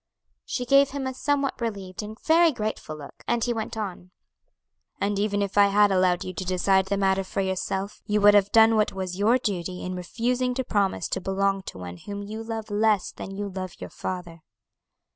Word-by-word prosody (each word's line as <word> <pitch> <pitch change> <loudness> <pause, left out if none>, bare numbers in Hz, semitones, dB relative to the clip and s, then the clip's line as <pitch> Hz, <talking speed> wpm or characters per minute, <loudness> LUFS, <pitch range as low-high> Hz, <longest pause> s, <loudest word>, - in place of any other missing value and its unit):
She 250 - -3
gave 275 +2 +5
him 275 -1 -4
a 260 - -2
somewhat 280 0 -1
relieved 200 -5 -4
and 215 +2 -8
very 330 +1 +5
grateful 215 - -4
look, 145 -2 -12
and 235 -1 +1
he 240 - +1
went 220 0 -4
on: 185 -4 -5 0.9
"And 200 0 0
even 205 0 +1
if 200 +1 0
I 200 - +7
had 205 0 +4
allowed 185 -2 +2
you 185 - -6
to 185 - -4
decide 190 +1 +2
the 200 +1 0
matter 195 0 +2
for 190 - -5
yourself, 190 +1 -3
you 210 -1 +2
would 205 0 +7
have 205 -1 +4
done 225 0 +6
what 215 - +2
was 185 -1 -4
your 225 +5 +4
duty 185 -6 -3
in 185 - -3
refusing 245 +7 -1
to 260 - -1
promise 200 -5 0
to - - -2
belong 195 +1 0
to - - -7
one 90 -1 -7
whom 200 - -7
you 215 +2 -6
love 225 -1 -5
less 210 -2 +2
than 195 - -8
you 205 +1 -3
love 185 -2 -6
your - - -8
father." 175 -3 -5
200 Hz, 205 wpm, -25 LUFS, 190-225 Hz, 0.9 s, I